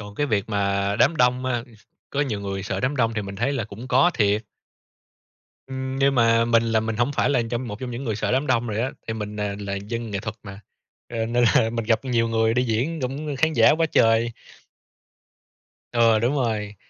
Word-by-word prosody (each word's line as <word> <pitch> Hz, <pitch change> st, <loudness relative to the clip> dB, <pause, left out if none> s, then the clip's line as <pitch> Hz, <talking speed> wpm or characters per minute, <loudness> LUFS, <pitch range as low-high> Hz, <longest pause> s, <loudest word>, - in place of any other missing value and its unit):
Còn 105 Hz, -1 st, -9 dB
cái 145 Hz, -, 0 dB
việc 105 Hz, -3 st, -1 dB
mà 100 Hz, -1 st, 0 dB
đám 165 Hz, -, +4 dB
đông 125 Hz, 0 st, +2 dB
á, 120 Hz, -2 st, -1 dB, 0.5 s
có 145 Hz, -, -1 dB
nhiều 110 Hz, -8 st, -1 dB
người 100 Hz, -1 st, -4 dB
sợ 110 Hz, -, -3 dB
đám 135 Hz, +3 st, -1 dB
đông 115 Hz, -2 st, +1 dB
thì 105 Hz, -, -2 dB
mình 100 Hz, 0 st, -7 dB
thấy 120 Hz, +7 st, 0 dB
là 125 Hz, -7 st, -2 dB
cũng 110 Hz, +5 st, -10 dB
có 175 Hz, -, +4 dB
thiệt. 105 Hz, 0 st, +1 dB, 1.2 s
Ừm, 130 Hz, 0 st, -4 dB
nhưng 135 Hz, 0 st, +3 dB
mà 115 Hz, -1 st, +4 dB
mình 115 Hz, -1 st, +3 dB
là 115 Hz, -1 st, +1 dB
mình 110 Hz, 0 st, -3 dB
hổng 120 Hz, +4 st, +1 dB
phải -, -, +2 dB
là 125 Hz, -4 st, +2 dB
trong 120 Hz, +1 st, -3 dB
một 105 Hz, 0 st, -7 dB
trong 125 Hz, -2 st, -5 dB
những 120 Hz, +3 st, -5 dB
người 110 Hz, -5 st, -2 dB
sợ 110 Hz, -, -1 dB
đám 135 Hz, +3 st, +1 dB
đông 120 Hz, -2 st, +1 dB
rồi 105 Hz, 0 st, -2 dB
á, 130 Hz, -, -1 dB, 0.2 s
thì 115 Hz, -, -2 dB
mình, 105 Hz, -1 st, -5 dB
à, 105 Hz, -1 st, -2 dB
là 100 Hz, -1 st, -4 dB
dân 115 Hz, +3 st, -5 dB
nghệ 100 Hz, -, -2 dB
thuật 105 Hz, +1 st, -5 dB
mà, 100 Hz, 0 st, -9 dB, 0.5 s
ơ, 115 Hz, -1 st, -1 dB
nên 120 Hz, +1 st, +1 dB
là 110 Hz, -, +4 dB
mình 115 Hz, -1 st, -3 dB
gặp 115 Hz, +3 st, +1 dB
nhiều 115 Hz, -2 st, +1 dB
người 115 Hz, 0 st, +1 dB
đi 125 Hz, +1 st, +2 dB
diễn 130 Hz, +7 st, -1 dB
cũng 140 Hz, +3 st, -3 dB
khán 160 Hz, +2 st, +2 dB
giả -, -, +6 dB
quá 165 Hz, -, +3 dB
trời. 115 Hz, +1 st, +3 dB, 1.6 s
Ừ, 115 Hz, -2 st, +4 dB
đúng 120 Hz, +5 st, +1 dB
rồi. 110 Hz, -5 st, -2 dB
115 Hz, 225 wpm, -23 LUFS, 105-125 Hz, 1.6 s, giả